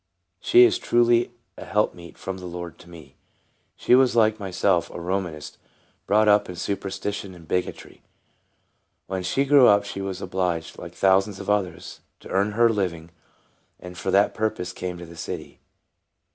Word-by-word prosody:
She 120 - +6
is 120 - +4
truly 120 0 +2 0.3
a - - -7
helpmeet 90 -5 -2
from 95 0 -6
the 90 - -8
Lord 85 -2 -7
to 85 - -16
me. 85 -2 -14 0.6
She - - +1
was, 130 -2 +5
like 110 -1 +3
myself, 95 -2 0
a - - -8
Romanist, 85 -4 -4 0.5
brought 105 +2 +3
up 105 -1 +4
in 90 - -6
superstition 100 +1 -4
and 85 -2 -15
bigotry. 90 +2 -4 1.0
When 95 0 -4
she 135 +10 0
grew 140 -2 +6
up 100 0 +5
she 100 -1 -6
was 95 -1 -4
obliged, 90 -4 -3
like - - -10
thousands 95 +1 +2
of - - -2
others, 100 -4 -3 0.2
to - - -12
earn 100 +2 0
her 120 +2 +3
own 115 - 0
living, 85 -4 -3 0.7
and 90 0 -10
for 95 - -4
that 100 +2 +3
purpose 110 -5 -2
came 90 -1 -5
to 85 - -9
the 85 0 -13
city. - - -7
95 Hz, 170 wpm, -24 LUFS, 90-105 Hz, 1.0 s, She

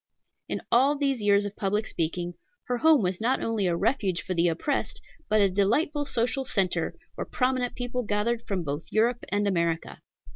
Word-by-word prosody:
In - - -3
all 270 +5 +5
these 275 -4 0
years 205 0 +3
of 205 0 -5
public 210 +2 0
speaking, 175 0 -2 0.3
her 245 -1 -2
home 315 -5 +5
was 185 +2 -1
not 250 +4 +2
only 220 -4 0
a 175 - +1
refuge 195 -2 0
for 185 - -3
the 170 0 +2
oppressed, 220 - -1 0.3
but 215 0 +4
a 200 - +6
delightful 235 - +1
social 245 +2 0
centre, 185 -8 0 0.2
where - - -5
prominent 255 -1 0
people 245 0 -2
gathered 220 +2 0
from 190 -4 -1
both 145 +1 -4
Europe 235 +3 +1
and 205 +1 +1
America. 170 -4 -1
210 Hz, 180 wpm, -27 LUFS, 185-245 Hz, 0.3 s, a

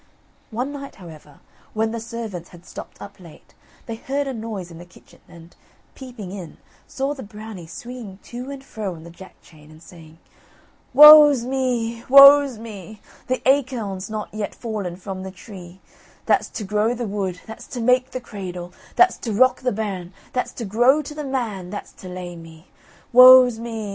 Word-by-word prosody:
One 250 +5 -4
night, 280 -1 -9
however, 155 -5 -14 0.3
when 220 +1 0
the 230 - -4
servants 225 -6 -7
had 175 0 -16
stopped - - -11
up 200 -1 -11
late, 170 -4 -16 0.3
they 230 - -6
heard 280 +4 -3
a 270 - -4
noise 215 -6 -7
in 165 - -12
the - - -10
kitchen, 175 - -21
and, 170 0 -16 0.4
peeping 245 -8 -10
in, 185 -5 -9 0.3
saw 270 +2 -3
the 275 - -10
Brownie 210 -5 -10
swinging 235 -1 -9
to 245 +2 -8
and 275 -1 -8
fro 210 -8 -6
on 160 - -13
the 170 - -12
Jack 185 +1 -15
chain, 150 -2 -19
and 155 0 -16
saying: 160 -2 -15 0.7
"Woe's 295 -2 +9
me! 245 -3 -2
woe's 275 -1 +8
me! 215 -2 -10 0.3
The 255 0 -2
acorn's 235 -8 0
not 215 -1 -6
yet 215 -1 -5
Fallen 210 -7 -5
from 190 +1 -7
the 190 - -7
tree, 185 -1 -13 0.4
That's - - +1
to 215 - -6
grow 210 +4 0
the 240 0 -4
wood, 195 -3 -4
That's 220 - -11
to 250 - -7
make 250 +2 +2
the 255 - -5
cradle, 180 -6 -8 0.2
That's 365 +1 +4
to 230 - -5
rock 255 +5 +3
the 255 -1 0
bairn, 195 -4 -5 0.2
That's 250 - -2
to 235 - -6
grow 245 +9 +3
to 295 - -8
the 300 0 -6
man, 230 -9 -4
That's 205 - -8
to 185 - -9
lay 180 -1 -7
me. 165 0 -14 0.4
Woe's 250 -1 +8
me! 235 0 -6
220 Hz, 180 wpm, -21 LUFS, 185-255 Hz, 0.7 s, Woe's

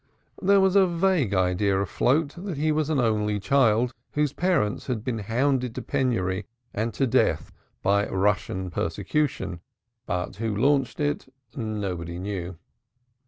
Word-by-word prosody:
There 200 +1 +5
was 190 0 +3
a 195 -2 +6
vague 170 - +1
idea 95 +2 +2
afloat 140 - +1
that 180 -2 -5
he 155 +2 +1
was 155 0 0
an 155 -3 +1
only 105 -3 +1
child 120 0 +3 0.2
whose 150 -2 +1
parents 170 - 0
had 120 -5 -2
been 120 -3 -2
hounded 125 +3 0
to - - -4
penury 115 -10 -1 0.3
and 110 +3 -1 0.2
death - - +2 0.3
by 100 +1 +3
Russian 95 -1 0
persecution, 95 - -1 0.5
but 90 -1 -3
who 110 -1 -2
launched 135 +3 +2
it 145 -2 -1 0.3
nobody 95 -7 -3
knew. 90 -2 -4
115 Hz, 135 wpm, -25 LUFS, 100-145 Hz, 0.5 s, a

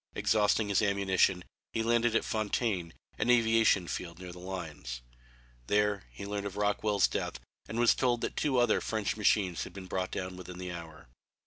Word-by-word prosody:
Exhausting 105 0 +2
his 100 - +3
ammunition 95 -3 +2 0.3
he 115 - 0
landed 120 0 +2
at - - +2
Fontaine, 105 -5 -1 0.3
an - - +1
aviation 115 -6 +4
field 85 -1 -5
near 90 0 -8
the 90 - -10
lines. 80 -10 -6 0.6
There 105 -1 +1
he - - -8
learned 100 0 -3
of 100 - -8
Rockwell's 105 -1 +2
death - - -3 0.3
and 110 +2 -3
was 120 -1 +6
told 120 -2 +1
that - - -3
two 140 -4 +1
other 120 0 +3
French 110 -2 -1
machines 100 -4 +2
had - - -9
been 95 -1 -8
brought 95 0 -2
down 90 0 -4
within 90 0 -9
the 90 0 -5
hour. 85 -4 -9
100 Hz, 180 wpm, -31 LUFS, 90-110 Hz, 0.6 s, was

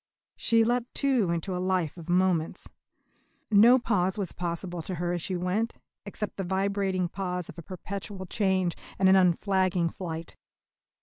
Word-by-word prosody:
She 230 -1 +3
leapt, 240 +1 -1
too, 260 -9 +2
into 170 +2 -1
a 180 - -2
life 185 -4 0
of 170 -1 -10
moments. 180 -2 +1 0.8
No 225 +5 +7
pause 205 -5 0
was 195 -3 -2
possible 175 0 -4
to 180 +3 -5
her 175 +1 -1
as 175 - -2
she 185 - -3
went, 185 +6 -1 0.3
except 210 +1 -4
the 195 - -2
vibrating 190 0 0
pause 180 -1 -4
of 165 - -9
a - - -6
perpetual 190 +2 -6
change 185 -2 +1 0.2
and 190 - +4
of 190 - +7
an 190 - +7
unflagging 185 -1 +1
flight. 165 -2 -6
185 Hz, 165 wpm, -28 LUFS, 175-200 Hz, 0.8 s, No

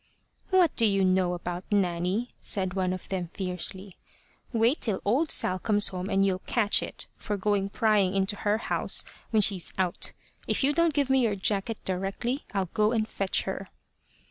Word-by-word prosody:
"What 370 -5 +4
do 230 - +4
you 195 -2 +2
know 185 -1 +2
about 175 +1 -5
Nanny?" 190 +4 0
said 185 -3 0
one 185 -1 0
of 185 -1 -5
them 180 -3 -3
fiercely. 190 +1 -3 0.5
"Wait 235 +4 +2
till 210 -5 0
old 270 +10 +2
Sal 185 0 +2
comes 205 +1 +3
home, 185 0 -5
and 195 -1 +3
you'll 185 -1 0
catch 210 +1 +2
it, - - -7
for 210 - -3
going 200 0 0
prying 200 -3 +2
into 195 +1 0
her 210 +1 +1
house - - -1 0.2
when 215 -2 +3
she's 190 -4 +1
out. 185 -2 -1 0.3
If - - 0
you 285 +2 +3
don't 335 -1 +2
give 280 -3 +1
me 265 -1 +4
your 220 -4 +1
jacket 200 +3 0
directly, 195 +8 -2
I'll 195 -4 -1
go 215 +1 +2
and 220 -2 0
fetch 195 -3 0
her." 190 0 -5
200 Hz, 180 wpm, -27 LUFS, 185-225 Hz, 0.5 s, What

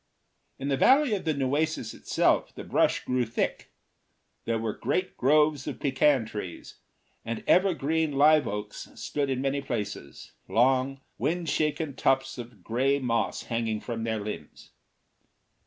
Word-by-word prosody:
In 135 +1 -4
the 135 - +1
valley 265 - +5
of 195 - -2
the 160 - +2
Nueces 140 -2 -1
itself, - - +1
the - - -7
brush - - +1
grew 125 0 +1
thick. 115 0 -3 0.7
There 115 0 0
were 110 -1 -2
great 185 0 -2
groves 150 +1 +3
of - - -5
pecan 135 -2 +2
trees, 105 -5 -7 0.5
and 115 0 -4
ever 185 0 +4
green 160 +1 0
live 150 +2 +5
oaks 105 +1 -5
stood 145 -2 -2
in 130 -1 -1
many 140 +1 0
places, 115 -6 -5 0.2
long, 130 +3 +2 0.2
wind 170 0 -1
shaken 150 -1 0
tufts 135 -1 +1
of 115 -6 -10
gray 130 +6 +1
moss 125 -4 -1
hanging 115 -2 -2
from 115 0 -5
their 110 -1 -1
limbs. 105 +1 -8
135 Hz, 145 wpm, -27 LUFS, 115-150 Hz, 0.7 s, valley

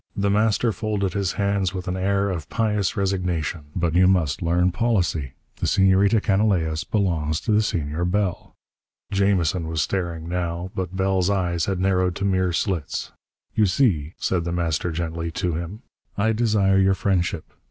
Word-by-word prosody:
The 100 0 +1
Master 110 +2 +2
folded 100 -2 -2
his 100 -3 -1
hands 100 -2 0
with 90 +1 -5
an 90 - -1
air 100 +1 +1
of 85 -4 -5
pious 105 -4 0
resignation. 90 -5 -1
"But 85 -3 0
you 90 +1 +5
must 85 -8 +1
learn 90 +2 +2
policy. 90 - 0 0.2
The - - -1
Senorita 95 +2 +4
Canalejas 95 -7 +1
belongs 80 -7 0
to 115 - -2
the 105 +1 +4
Senor 80 -5 -2
Bell." 95 0 -2 0.6
Jamison 95 -4 +1
was 80 -2 0
staring, 85 -3 -3
now, 85 +1 -3
but 95 0 -4
Bell's 95 -1 +1
eyes 85 -4 0
had 95 -2 -2
narrowed 90 -1 +1
to 100 - -2
mere 95 -2 +1
slits. 85 -3 -2 0.4
"You 105 -2 +3
see," 90 - +1
said 90 -3 0
The 85 - -3
Master 85 0 -1
gently, 85 0 -3
to 85 0 -1
him, 85 - -5 0.3
"I 110 +2 +2
desire 105 -4 +2
your 95 0 +3
friendship. 90 -4 -1
95 Hz, 165 wpm, -23 LUFS, 85-100 Hz, 0.6 s, you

